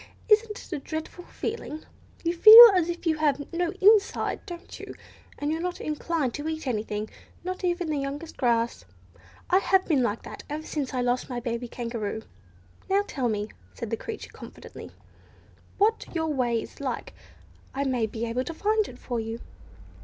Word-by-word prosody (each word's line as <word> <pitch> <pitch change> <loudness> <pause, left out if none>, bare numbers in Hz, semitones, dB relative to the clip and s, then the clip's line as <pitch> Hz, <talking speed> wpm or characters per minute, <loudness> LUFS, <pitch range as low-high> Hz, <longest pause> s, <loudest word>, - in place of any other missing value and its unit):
Isn't 435 +1 +5
it - - -9
a 305 - -2
dreadful 315 +4 -6
feeling? 370 -9 -5 0.4
You 335 0 +1
feel 450 +6 +12
as 350 -2 +2
if 345 +1 -5
you 320 -2 +2
had 290 0 0
no 345 0 0
inside, 415 +1 +3
don't 345 -2 -9
you? - - -9 0.4
And 290 +1 -2
you're 320 +1 -2
not 360 0 -3
inclined 305 -3 -2
to 290 +2 -5
eat 315 -1 -4
anything—not 220 - -5
even 350 -1 0
the 295 - -1
youngest 285 +4 -5
grass. 235 - 0 0.7
I 370 - +6
have 385 -1 +2
been 290 -6 +2
like 230 -2 -1
that - - -9
ever 305 +2 -5
since 275 -4 -3
I 250 - 0
lost 245 +2 0
my 245 -1 -3
baby 235 0 -3
Kangaroo. 230 -3 -4 0.7
Now 395 +1 +3
tell 255 -9 -2
me," 210 0 -2 0.3
said 230 - -6
the - - +1
creature 440 - -7
confidentially, - - -11 0.9
"what 435 +3 +2
your 320 -2 0
way 240 -4 +1
is - - -10
like. 260 -4 -4 0.6
I 275 - 0
may 250 -5 0
be 220 +2 -4
able 235 +2 -1
to 330 - -6
find 430 +3 +1
it 245 - -11
for 240 -2 -4
you." 225 +1 -4
290 Hz, 175 wpm, -26 LUFS, 240-350 Hz, 0.9 s, feel